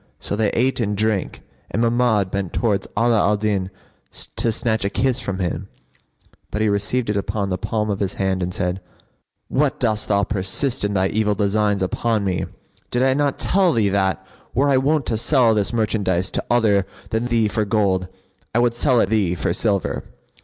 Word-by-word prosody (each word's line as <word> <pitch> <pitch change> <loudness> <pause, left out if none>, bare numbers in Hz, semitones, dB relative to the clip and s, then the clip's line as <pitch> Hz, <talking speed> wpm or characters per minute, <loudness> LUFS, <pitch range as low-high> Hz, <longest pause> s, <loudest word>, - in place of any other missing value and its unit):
So - - -2
they 105 -1 +1
ate 130 +3 +1
and 105 -3 -1
drank 110 -2 -1 0.3
and - - -2
Mahmud 115 -5 +2
bent 100 -3 -3
towards 105 -5 0
Ala 115 -1 +3
al 105 +1 +2
Din 100 -3 -1 0.7
to 115 - +2
snatch 110 0 -1
a 100 - 0
kiss 130 +3 0
from 100 -6 -4
him; 90 0 -3 0.8
but 105 - -3
he 110 0 +2
received 105 +3 0
it 105 - -1
upon 100 0 -2
the 90 - -1
palm 105 -1 -1
of 100 - -2
his 100 -2 -1
hand 95 -1 0
and 90 0 -2
said, 90 0 -2 0.7
"What, 145 0 0
dost 110 -3 0
thou 100 -1 +2
persist 100 +7 -1
in 105 0 -1
thy 95 0 +2
evil 105 -1 +1
designs 105 -1 +1
upon 110 +3 0
me? 95 -2 -1 0.4
Did 120 +1 +1
I 130 0 +4
not 140 0 0
tell 185 -3 +2
thee 110 -4 +2
that, 95 -1 0 0.3
were 140 +3 +3
I 135 - +4
wont 140 +1 +1
to 110 - -1
sell 125 -3 +4
this 105 0 0
merchandise 100 -5 0
to - - -1
other 105 -5 +3 0.2
than 115 +2 0
thee 115 -3 +2
for 110 +1 0
gold, 100 -3 +1 0.5
I - - +4
would 120 0 +3
sell 125 +1 +2
it 95 - +1
thee 100 -5 +1
for 85 - -1
silver?" 100 -1 0
105 Hz, 195 wpm, -21 LUFS, 100-120 Hz, 0.8 s, I